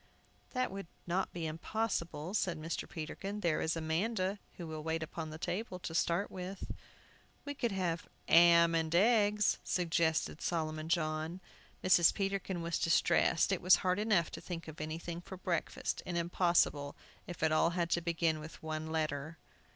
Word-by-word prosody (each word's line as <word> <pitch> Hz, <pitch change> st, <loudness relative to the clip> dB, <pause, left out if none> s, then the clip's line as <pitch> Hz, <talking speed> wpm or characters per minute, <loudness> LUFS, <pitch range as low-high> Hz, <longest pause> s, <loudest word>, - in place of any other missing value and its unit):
"That 255 Hz, -1 st, 0 dB
would 195 Hz, -2 st, -6 dB, 0.2 s
not 180 Hz, +2 st, 0 dB
be 170 Hz, -2 st, -4 dB
impossible," 170 Hz, 0 st, -2 dB
said 185 Hz, -5 st, 0 dB
Mr. 160 Hz, +2 st, -4 dB
Peterkin. 195 Hz, +6 st, -5 dB
"There 170 Hz, -4 st, +1 dB
is 160 Hz, -, 0 dB
Amanda, 185 Hz, +5 st, -1 dB, 0.2 s
who 175 Hz, -, -7 dB
will 155 Hz, -1 st, -5 dB
wait 160 Hz, +1 st, -2 dB
on 160 Hz, -2 st, -4 dB
table, 180 Hz, +4 st, -3 dB
to 175 Hz, -2 st, -6 dB
start 170 Hz, +4 st, +1 dB
with 185 Hz, +1 st, -6 dB, 0.4 s
" -, -, -31 dB
"We 285 Hz, -, -3 dB
could 240 Hz, -5 st, -1 dB
have 175 Hz, -4 st, -2 dB, 0.2 s
'am 170 Hz, 0 st, +7 dB
and 165 Hz, 0 st, +1 dB
eggs," 210 Hz, 0 st, +4 dB
suggested 165 Hz, -3 st, 0 dB
Solomon 155 Hz, -2 st, -2 dB
John 160 Hz, +1 st, -1 dB, 0.4 s
Mrs. 175 Hz, -2 st, +6 dB
Peterkin 195 Hz, -3 st, -2 dB
was 170 Hz, 0 st, -1 dB
distressed. 165 Hz, +2 st, +3 dB
It 190 Hz, -, 0 dB
was 185 Hz, +1 st, +7 dB
hard 185 Hz, +1 st, +2 dB
enough 210 Hz, -6 st, +2 dB
to -, -, -7 dB
think 170 Hz, -2 st, -6 dB
of 160 Hz, -1 st, -8 dB
anything 165 Hz, +2 st, -4 dB
for 190 Hz, +1 st, -9 dB
breakfast, 175 Hz, -2 st, -2 dB
and 175 Hz, -1 st, -3 dB
impossible, 170 Hz, -4 st, +2 dB, 0.3 s
if 175 Hz, -3 st, -6 dB
it 160 Hz, -, +3 dB
all 155 Hz, +1 st, +4 dB
had 170 Hz, -1 st, 0 dB
to 170 Hz, -, +2 dB
begin 165 Hz, -2 st, 0 dB
with 155 Hz, +1 st, -10 dB
one 155 Hz, 0 st, -3 dB
letter. 155 Hz, 0 st, -2 dB
170 Hz, 165 wpm, -34 LUFS, 160-185 Hz, 0.4 s, am